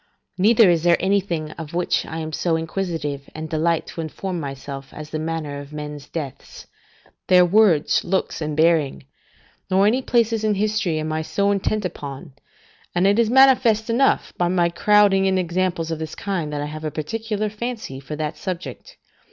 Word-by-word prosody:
Neither 220 Hz, +2 st, +6 dB
is 165 Hz, -2 st, +1 dB
there 175 Hz, 0 st, +4 dB
anything 180 Hz, -5 st, 0 dB
of 160 Hz, 0 st, -7 dB
which 175 Hz, 0 st, 0 dB
I 160 Hz, -, -6 dB
am 160 Hz, -1 st, -5 dB
so 165 Hz, +1 st, 0 dB
inquisitive, 160 Hz, -4 st, -3 dB
and 155 Hz, 0 st, -5 dB
delight 160 Hz, +1 st, 0 dB
to 165 Hz, -, -6 dB
inform 175 Hz, +3 st, -4 dB
myself, 135 Hz, -1 st, -7 dB
as 155 Hz, 0 st, -9 dB
the 155 Hz, -, -3 dB
manner 155 Hz, -3 st, -4 dB
of 145 Hz, 0 st, -10 dB
men's 150 Hz, -1 st, -7 dB
deaths, 145 Hz, -6 st, -7 dB, 0.6 s
their 180 Hz, -1 st, +6 dB
words, 180 Hz, -5 st, +3 dB
looks, 190 Hz, -2 st, -1 dB
and 155 Hz, -1 st, -3 dB
bearing; 160 Hz, -5 st, +2 dB, 0.6 s
nor 190 Hz, +1 st, +4 dB
any 240 Hz, +5 st, +3 dB
places 230 Hz, -3 st, +1 dB
in 215 Hz, -1 st, +2 dB
history 210 Hz, -5 st, 0 dB
I -, -, -1 dB
am 155 Hz, 0 st, -2 dB
so 200 Hz, +5 st, 0 dB
intent 200 Hz, +1 st, -1 dB
upon; 140 Hz, -6 st, -7 dB, 0.6 s
and 175 Hz, +2 st, +2 dB
it 200 Hz, +3 st, +4 dB
is 230 Hz, -2 st, +3 dB
manifest 245 Hz, -4 st, +5 dB
enough, 265 Hz, +4 st, +2 dB
by 175 Hz, -, +2 dB
my 175 Hz, -1 st, +2 dB
crowding 200 Hz, +1 st, +4 dB
in 190 Hz, 0 st, +2 dB
examples 175 Hz, -2 st, -1 dB
of 160 Hz, -, -3 dB
this 160 Hz, -1 st, -5 dB
kind, 180 Hz, -7 st, -3 dB
that 145 Hz, -1 st, -3 dB
I -, -, -2 dB
have 155 Hz, +1 st, -7 dB
a 155 Hz, -, -1 dB
particular 215 Hz, -, -3 dB
fancy 215 Hz, -, -5 dB
for 140 Hz, +3 st, -7 dB
that 150 Hz, 0 st, -4 dB
subject. 185 Hz, -, -6 dB
170 Hz, 180 wpm, -22 LUFS, 155-200 Hz, 0.6 s, Neither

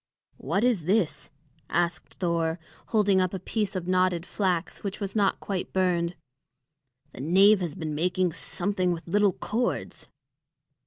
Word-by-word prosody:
"What 195 Hz, -, 0 dB
is 230 Hz, -10 st, +2 dB
this?" 175 Hz, -6 st, 0 dB, 0.4 s
asked 175 Hz, 0 st, -1 dB
Thor, 170 Hz, -2 st, 0 dB, 0.3 s
holding 205 Hz, -4 st, +3 dB
up 185 Hz, +1 st, 0 dB
a -, -, -4 dB
piece 205 Hz, +2 st, -2 dB
of 180 Hz, -2 st, -3 dB
knotted 185 Hz, -2 st, +2 dB
flax 180 Hz, -2 st, -1 dB
which 200 Hz, -1 st, -4 dB
was 200 Hz, -1 st, -4 dB
not 200 Hz, -2 st, +2 dB
quite 195 Hz, -3 st, -4 dB
burned. 180 Hz, -2 st, +1 dB, 1.0 s
"The 125 Hz, -, -9 dB
knave 195 Hz, +7 st, +5 dB
has 170 Hz, -5 st, -3 dB
been 155 Hz, -2 st, -4 dB
making 180 Hz, +3 st, +1 dB
something 185 Hz, +2 st, -1 dB
with 165 Hz, 0 st, -8 dB
little 205 Hz, +2 st, +3 dB
cords." 235 Hz, +7 st, -3 dB
185 Hz, 145 wpm, -27 LUFS, 170-200 Hz, 1.0 s, knave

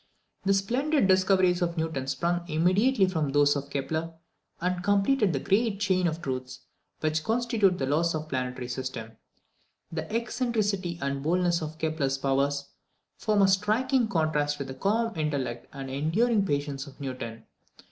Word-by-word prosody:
The 195 Hz, -, +4 dB
splendid 255 Hz, +6 st, +1 dB
discoveries 185 Hz, -1 st, +3 dB
of 170 Hz, -1 st, -1 dB
Newton 160 Hz, -5 st, -2 dB
sprung 170 Hz, +6 st, 0 dB
immediately 190 Hz, +9 st, +3 dB
from 160 Hz, -6 st, -1 dB
those 145 Hz, +1 st, +4 dB
of 140 Hz, 0 st, -4 dB
Kepler, 160 Hz, +4 st, -3 dB, 0.5 s
and 180 Hz, +1 st, -1 dB
completed 205 Hz, +2 st, +3 dB
the 140 Hz, -, -1 dB
great 205 Hz, -, +1 dB
chain 185 Hz, -3 st, +2 dB
of 165 Hz, +1 st, -3 dB
truths 130 Hz, -1 st, -4 dB, 0.4 s
which 155 Hz, 0 st, 0 dB
constitute 225 Hz, -4 st, +2 dB
the 135 Hz, -, -1 dB
laws 160 Hz, +4 st, +1 dB
of 155 Hz, -, -2 dB
the 155 Hz, -, -17 dB
planetary 125 Hz, -2 st, -3 dB
system. 125 Hz, -3 st, -5 dB, 0.8 s
The 160 Hz, +1 st, -5 dB
eccentricity 220 Hz, -6 st, -1 dB
and 140 Hz, 0 st, -2 dB
boldness 175 Hz, +2 st, +1 dB
of 155 Hz, 0 st, -5 dB
Kepler's 155 Hz, -4 st, -1 dB
powers 140 Hz, +1 st, 0 dB, 0.5 s
form 210 Hz, -2 st, +2 dB
a -, -, +6 dB
striking 220 Hz, +6 st, +2 dB
contrast 155 Hz, -6 st, 0 dB
with 140 Hz, -2 st, -5 dB
the -, -, -4 dB
calm 225 Hz, -, 0 dB
intellect 140 Hz, -7 st, -2 dB
and 135 Hz, -1 st, -7 dB
the 130 Hz, -, -6 dB
enduring 200 Hz, -, +2 dB
patience 145 Hz, -1 st, -2 dB
of 140 Hz, -, -14 dB
Newton. 120 Hz, -5 st, -6 dB
165 Hz, 155 wpm, -27 LUFS, 140-195 Hz, 0.8 s, a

